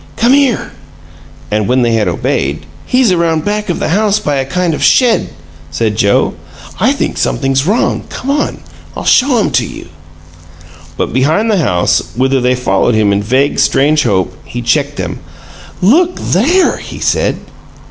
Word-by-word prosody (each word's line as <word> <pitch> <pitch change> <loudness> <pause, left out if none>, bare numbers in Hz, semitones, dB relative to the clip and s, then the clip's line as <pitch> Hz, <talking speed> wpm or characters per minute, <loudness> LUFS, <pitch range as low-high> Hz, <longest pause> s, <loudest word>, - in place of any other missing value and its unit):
"Come 235 +3 +3
here!" 275 -4 +1 0.8
And, 105 -1 0
when 125 0 +2
they 120 -1 +1
had 110 -2 +1
obeyed, 70 +3 -2 0.2
"He's 250 -5 +2
around 165 -3 0
back 210 0 -2
of 175 - -1
the - - -2
house 205 +3 +2
by 150 -8 -1
a 135 - -1
kind 175 +4 -1
of - - -3
shed," 245 -3 +3 0.4
said 105 +7 -1
Joe. 100 -1 +2 0.5
"I - - +3
think - - -2
something's 135 - 0
wrong. 220 +5 0
Come 275 - -4
on, 290 +1 -2 0.3
I'll - - -6
show 255 -1 +3
him 215 - 0
to 125 0 +2
you." 100 - -9 1.1
But - - -2
behind 155 - +1
the 205 - +2
house, 90 - +1
whither 130 +1 +1
they 125 +1 +2
followed 120 -1 +1
him 105 -2 +2
in 100 - 0
vague, 130 +7 0
strange 150 +2 +2
hope, 95 -8 0
he 120 0 -7
checked 140 +4 0
them. - - -5 0.6
"LOOK 340 - +3
THERE!" 325 - +2
he - - -9
said. - - 0
145 Hz, 170 wpm, -13 LUFS, -, 1.1 s, Come